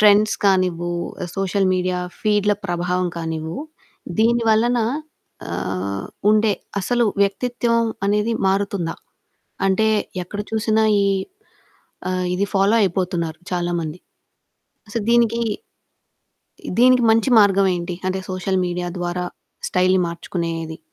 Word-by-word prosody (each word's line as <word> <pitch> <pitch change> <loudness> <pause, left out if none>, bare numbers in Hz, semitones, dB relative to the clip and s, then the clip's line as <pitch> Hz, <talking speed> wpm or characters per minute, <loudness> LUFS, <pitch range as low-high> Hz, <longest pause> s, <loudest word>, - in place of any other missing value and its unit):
Trends 210 0 +5
కానివ్వు, 180 -3 +2 0.5
social 195 0 +1
media 180 0 0 0.2
ఫీడ్‌ల 210 -1 +2
ప్రభావం 180 +1 0
కానివ్వు, 160 -1 -4 0.6
దీని 235 +1 +3
వలన 235 +3 +3 0.7
ఆహ్, 95 +3 -3 0.2
ఉండే 215 0 +4 0.3
అసలు 240 +5 +1 0.2
వ్యక్తిత్వం 230 +3 +1 0.2
అనేది 210 +3 +1
మారుతుందా? 195 -3 0 0.7
అంటే 195 +3 +3 0.4
ఎక్కడ 205 +4 -7
చూసినా 220 0 +2 0.2
ఈ - - +2 1.1
ఆహ్, 185 0 -1
ఇది 195 +2 0
ఫాలో 195 +2 +4
అయిపోతున్నారు 175 -3 -1
చాలా 175 -1 0
మంది. 160 +1 -5 1.0
సో - - +1
దీనికి, 235 0 +3 1.4
దీనికి 250 -1 +6
మంచి 225 +3 +3
మార్గం 195 -1 +4
ఏంటి? 175 0 -4
అంటే 190 0 -1
సోషల్ 185 +1 -1
మీడియా 175 0 -3
ద్వారా 175 0 -2 0.4
స్టైల్‌ని 185 0 +3
మార్చుకునేది. 165 -1 -4
190 Hz, 105 wpm, -21 LUFS, 175-215 Hz, 1.4 s, దీనికి